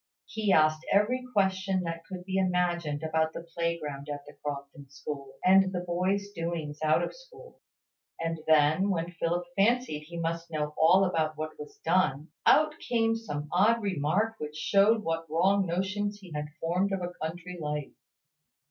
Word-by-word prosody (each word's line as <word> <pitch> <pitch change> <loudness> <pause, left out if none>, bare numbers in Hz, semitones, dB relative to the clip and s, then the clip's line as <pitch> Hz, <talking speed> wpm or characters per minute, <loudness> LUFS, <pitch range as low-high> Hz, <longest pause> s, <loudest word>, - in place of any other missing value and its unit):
He 215 -2 -1
asked 155 -2 +4
every 230 +6 +3
question 190 -3 +1
that 165 -1 -4
could 180 -1 -8
be 190 0 0
imagined 175 -5 0
about 160 0 0
the - - -6
playground 165 -4 -3
at 145 0 -6
the 145 - -12
Crofton 140 -1 -7
school, 140 -1 -7
and 190 0 +6
the 180 -2 -2
boys' 185 +3 -1
doings 165 -4 -4
out 155 +2 +3
of - - -3
school; - - -16 0.6
and 165 0 -2
then, 155 +5 +4
when 175 -2 -1
Philip 175 +1 -1
fancied 205 -7 +1
he 170 0 -8
must 165 0 -2
know 150 -2 -2
all 180 +5 +5
about 160 -4 0
what 155 0 -3
was 150 - -9
done, 165 -3 +2 0.2
out 310 0 +6
came 225 -1 +1
some 150 -10 -5
odd 215 +6 +4
remark 195 +5 0
which 150 0 -6
showed 205 +7 +3
what 165 0 -2
wrong 190 +4 +3
notions 205 +4 -1
he 185 -4 -13
had 150 -1 -3
formed 180 +4 0
of 190 -2 -2
a 175 0 -4
country 175 +2 -5
life. 150 -1 -3
170 Hz, 165 wpm, -29 LUFS, 155-195 Hz, 0.6 s, and